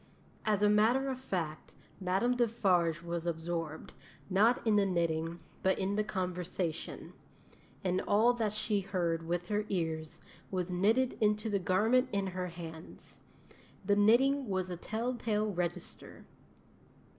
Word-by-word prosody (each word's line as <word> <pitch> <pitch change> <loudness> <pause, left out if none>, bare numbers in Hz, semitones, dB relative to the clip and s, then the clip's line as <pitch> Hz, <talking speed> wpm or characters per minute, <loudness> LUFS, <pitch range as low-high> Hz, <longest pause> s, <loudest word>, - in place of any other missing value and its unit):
As 210 -2 +2
a - - +6
matter 225 +6 +3
of 260 -1 -3
fact, 170 -11 -4 0.2
Madame 195 +7 +1
Defarge 185 -9 +2
was 170 0 -3
absorbed, 165 -1 -3 0.4
not 220 +7 +3
in 220 -2 +4
the 205 -1 +4
knitting, 170 -1 -1 0.2
but 190 - +2
in 195 +1 -1
the 215 +1 +1
conversation; 180 -4 -3 0.7
and 185 0 +1
all 220 +4 +5
that 225 -3 -1
she 215 -1 0
heard 175 -4 -1
with 175 +1 -2
her 210 0 +1
ears 160 -4 -2 0.3
was 185 -1 -2
knitted 220 +8 +2
into 210 +1 +2
the 200 - +2
garment 220 +8 +2
in 200 -1 0
her 185 -1 -3
hands. 165 -2 -10 0.7
The 205 +1 +3
knitting 245 +5 +4
was 185 -1 -1
a - - -2
tell 225 +8 -3
tale 215 -3 -1
register. 175 -1 -5
190 Hz, 140 wpm, -32 LUFS, 175-215 Hz, 0.7 s, a